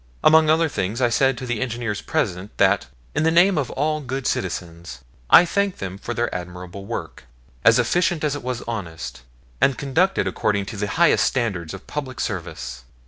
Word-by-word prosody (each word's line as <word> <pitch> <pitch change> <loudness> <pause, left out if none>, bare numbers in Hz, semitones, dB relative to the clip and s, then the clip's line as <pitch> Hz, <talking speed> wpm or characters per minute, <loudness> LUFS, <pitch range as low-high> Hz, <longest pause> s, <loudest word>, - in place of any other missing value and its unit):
Among 160 0 +6
other 160 +1 +4
things, 105 -5 -2
I 125 -2 +3
said 135 +2 +2
to 130 - -5
the 120 -2 -2
engineers 120 -4 -2
present 90 +4 -2
that - - +3 0.3
in - - 0
the 160 - +3
name 175 +4 +5
of 145 -5 -1
all 155 +2 -1
good 135 0 -4
citizens 85 -6 -3 0.3
I 175 - +9
thanked 200 +2 0
them 95 0 -6
for 120 - -5
their 120 0 -1
admirable 90 +2 -7
work, 85 - -6 0.4
as 115 +1 +6
efficient 170 +7 +1
as 150 -2 +1
it 145 - -5
was 125 -1 -4
honest, 95 -9 -5 0.4
and 135 - +3
conducted 160 - +1
according 100 +1 0
to 110 - -7
the 105 0 -2
highest 170 -1 +5
standards 100 - -1
of 95 - -12
public 130 -4 -5
service. 80 - -4
120 Hz, 185 wpm, -22 LUFS, 95-150 Hz, 0.4 s, I